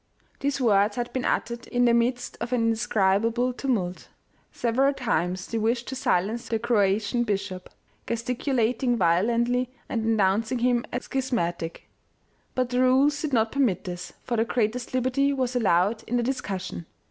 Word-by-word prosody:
These 280 0 -1
words 210 -4 +3
had 240 -1 -3
been 255 - -2
uttered 235 0 -1
in 245 0 +2
the 235 - +4
midst 245 +2 0
of 240 - -3
an 250 -2 +2
indescribable 225 +2 +1
tumult; 215 -9 -2 0.4
several 265 +4 +1
times 185 -6 -1
they 230 - -3
wished 235 +2 0
to 265 - -4
silence 225 -1 0
the 225 - 0
Croatian 220 0 +1
bishop, 195 -4 -3 0.4
gesticulating 240 0 0
violently 235 +8 +2 0.2
and 230 -2 -2
denounc 220 0 +2
ing 255 - +1
him 240 0 +1
as 245 - -4
schismatic; 175 -11 -2 0.7
but 255 -1 0
the 250 - +1
rules 270 +3 +3
did 305 - -2
not 225 -3 +2
permit 260 -10 +1
this, 180 -1 -6
for 235 - -2
the 225 - +3
greatest 240 +2 -1
liberty 260 +2 +2
was 255 -2 -1
allowed 210 -1 +2
in 245 - 0
the 240 - +1
discussion. 190 -9 -4
235 Hz, 160 wpm, -26 LUFS, 205-250 Hz, 0.7 s, the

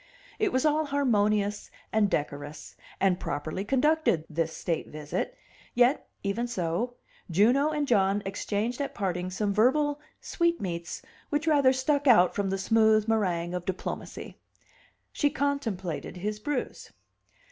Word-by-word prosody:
It 425 -3 +2
was 260 +3 +1
all 305 +1 +3
harmonious, 210 -7 +1 0.2
and 215 -2 +3
decorous, 145 0 -4 0.2
and 190 -2 +2
properly 155 +6 -3
conducted, 270 - +2
this 160 0 -2
state 165 -2 -2
visit; 150 -1 -4 0.4
yet 245 +3 +3
even 210 +5 -1
so, 220 +3 -2 0.3
Juno 240 - +4
and 300 -2 -1
John 200 -3 +2
exchanged 210 +6 -2
at 275 0 -4
parting 185 -3 -2
some 200 +2 -1
verbal 285 +7 +3 0.2
sweet 340 -1 0
meats 170 -3 -5 0.3
which 295 +2 0
rather 285 -5 +5
stuck 280 +2 0
out 185 -8 +6
from 200 -1 -1
the 195 - -1
smooth 220 +1 +3
meringue 180 -6 0
of 180 -1 -3
diplomacy. 185 0 -5 0.7
She 290 - +2
contemplated 225 - -2
his 210 +3 -3
bruise. 275 +3 -4
215 Hz, 135 wpm, -28 LUFS, 185-275 Hz, 0.7 s, out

